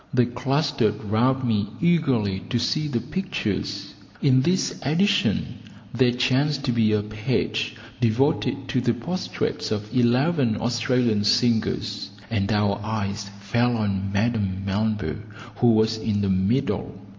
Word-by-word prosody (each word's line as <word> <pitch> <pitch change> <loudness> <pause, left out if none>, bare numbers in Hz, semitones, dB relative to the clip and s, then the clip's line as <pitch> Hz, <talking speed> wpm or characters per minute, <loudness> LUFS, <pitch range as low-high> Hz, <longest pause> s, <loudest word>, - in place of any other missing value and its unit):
They 125 -1 +5
clustered 125 -2 0
round 125 +6 +1
me 105 -2 +1
eagerly 135 - +2
to 120 - +1
see 135 +6 0
the 120 -5 -1
pictures. 105 - -3 0.3
In 130 -2 +4
this 175 +6 0
edition 195 +9 +1 0.3
there 130 -1 +3
chanced 135 +3 +1
to 125 - +1
be 115 -2 +2
a 105 -1 +1
page 110 +4 -2 0.2
devoted 130 +3 +1
to 125 - +1
the 120 -1 +1
portraits 185 +2 -3
of 105 +1 -4
eleven 125 0 +2
Australian 120 -2 +1
singers, 115 -1 +1 0.2
and 100 -2 0
our 105 -1 +1
eyes 105 -2 -3
fell 120 +4 +1
on 100 -2 -1
Madame 100 -3 0
Melba, 105 +1 -1 0.4
who 120 - +3
was 110 -1 +3
in 105 -2 -1
the 100 - 0
middle. 95 +3 0
115 Hz, 135 wpm, -24 LUFS, 105-130 Hz, 0.4 s, They